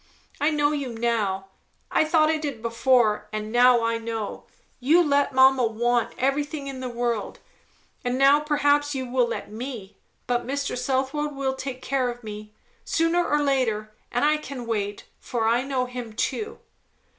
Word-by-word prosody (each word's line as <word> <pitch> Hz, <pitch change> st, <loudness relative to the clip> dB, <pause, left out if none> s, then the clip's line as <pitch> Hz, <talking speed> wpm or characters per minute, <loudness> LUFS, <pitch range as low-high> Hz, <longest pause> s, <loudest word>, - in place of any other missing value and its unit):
I 295 Hz, -, +3 dB
know 295 Hz, -1 st, +2 dB
you 280 Hz, -4 st, -3 dB
now. 215 Hz, -5 st, -1 dB, 0.4 s
I -, -, +3 dB
thought 310 Hz, 0 st, +3 dB
I 320 Hz, -, +1 dB
did 280 Hz, -7 st, -5 dB
before, 230 Hz, -2 st, +2 dB
and 215 Hz, 0 st, -4 dB
now 245 Hz, 0 st, +5 dB
I 230 Hz, 0 st, 0 dB
know. 225 Hz, -2 st, -5 dB, 0.3 s
You 310 Hz, +8 st, +4 dB
let 285 Hz, -2 st, +2 dB
mamma 260 Hz, -1 st, +5 dB
want 240 Hz, +2 st, 0 dB
everything 285 Hz, +2 st, -1 dB
in 270 Hz, -1 st, -6 dB
the 255 Hz, -1 st, -4 dB
world; 235 Hz, -2 st, -2 dB, 0.7 s
and 250 Hz, 0 st, -1 dB
now 275 Hz, +2 st, +6 dB
perhaps 290 Hz, -1 st, +1 dB
you 260 Hz, -1 st, -2 dB
will 250 Hz, -1 st, +1 dB
let 230 Hz, -, -5 dB
me; 225 Hz, -3 st, -7 dB, 0.3 s
but 245 Hz, -1 st, -1 dB
Mr. 280 Hz, +1 st, -2 dB
Southwode 270 Hz, +3 st, -1 dB
will 270 Hz, -1 st, -1 dB
take 265 Hz, -1 st, -6 dB
care 260 Hz, -2 st, 0 dB
of 240 Hz, 0 st, -7 dB
me, 210 Hz, 0 st, -8 dB, 0.3 s
sooner 330 Hz, +2 st, +1 dB
or 295 Hz, -3 st, +1 dB
later, 225 Hz, -6 st, 0 dB, 0.2 s
and 245 Hz, +4 st, +1 dB
I 305 Hz, +1 st, +4 dB
can 275 Hz, -5 st, -7 dB
wait, 205 Hz, -3 st, -3 dB
for 230 Hz, -2 st, -2 dB
I 235 Hz, +2 st, +3 dB
know 265 Hz, -1 st, -1 dB
him 245 Hz, -3 st, -7 dB
too." 425 Hz, -, -2 dB
255 Hz, 170 wpm, -25 LUFS, 230-285 Hz, 0.7 s, now